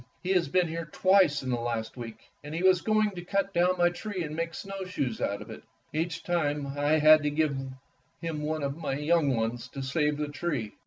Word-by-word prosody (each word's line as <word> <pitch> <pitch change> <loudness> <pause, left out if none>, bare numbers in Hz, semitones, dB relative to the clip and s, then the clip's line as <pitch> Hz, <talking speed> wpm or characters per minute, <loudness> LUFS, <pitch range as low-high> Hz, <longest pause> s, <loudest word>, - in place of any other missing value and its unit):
"He 185 - -1
has 180 -5 +3
been 180 +4 +2
here 165 0 -5
twice 185 -7 +4
in 130 - -2
the 120 - 0
last 115 -1 -3
week, 115 -3 -7 0.3
and 150 +2 -6
he 170 - -2
was 185 -2 +5
going 215 +1 +2
to 180 -2 -7
cut 195 +1 -1
down 180 +1 +3
my 175 0 +4
tree 185 +1 -4
to 150 - -4
make 165 +1 -3
snowshoes 185 - -4
out 100 0 -1
of - - -12
it. - - -9 0.3
Each 165 +2 -2
time 150 -5 0
I 145 +2 +1
had 155 0 +7
to 150 - 0
give 150 -1 +1 0.6
him 165 -3 -4
one 155 0 -2
of 140 0 -2
my 155 -4 -3
young 150 -2 +2
ones 115 +2 -2
to 135 +1 -7
save 150 +2 0
the 150 -1 -2
tree." 145 -8 -3
155 Hz, 220 wpm, -28 LUFS, 140-175 Hz, 0.6 s, had